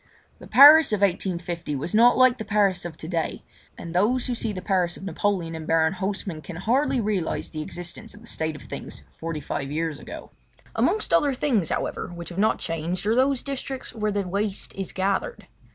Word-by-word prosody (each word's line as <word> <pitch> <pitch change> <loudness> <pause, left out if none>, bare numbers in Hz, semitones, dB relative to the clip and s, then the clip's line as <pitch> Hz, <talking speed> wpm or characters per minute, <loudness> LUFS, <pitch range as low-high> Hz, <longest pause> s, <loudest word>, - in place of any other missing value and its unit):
The - - -12
Paris 295 +2 +9
of 210 -2 0
1850 175 -4 -1
was 145 +5 -4
not 235 +3 +6
like 255 -1 +5
the - - -3
Paris 200 -3 +1
of 165 -2 -7
to 155 - -7
day, 165 -2 -2 0.3
and 170 -1 -7
those 225 +8 +2
who 250 - -1
see 225 -2 -2
the 190 - -5
Paris 180 -3 0
of - - -11
Napoleon 185 -2 -1
and 160 -1 -7
Baron 160 +1 +3
Hausseman 190 -3 -4
can 175 - -8
hardly 255 - +1
realise 205 -6 -1
the 155 - -5
existence 175 +5 -6
of 210 - -15
the - - -14
state 160 -8 -3
of 145 - -11
things - - -8 0.2
forty 165 -1 -4
five 135 0 -4
years 155 0 -2
ago. - - -9 0.4
Amongst 435 - +1
other 285 -3 +3
things, 235 - +1
however, - - -2
which 170 -1 -8
have 175 +2 -6
not 215 +2 +3
changed 165 +4 -3
are 215 - +3
those 260 +1 +2
districts 270 -1 -5
where 215 -2 -1
the 200 -2 -2
waste 200 +2 -2
is 195 -1 -5
gathered. 195 - -2
195 Hz, 200 wpm, -25 LUFS, 170-225 Hz, 0.4 s, Paris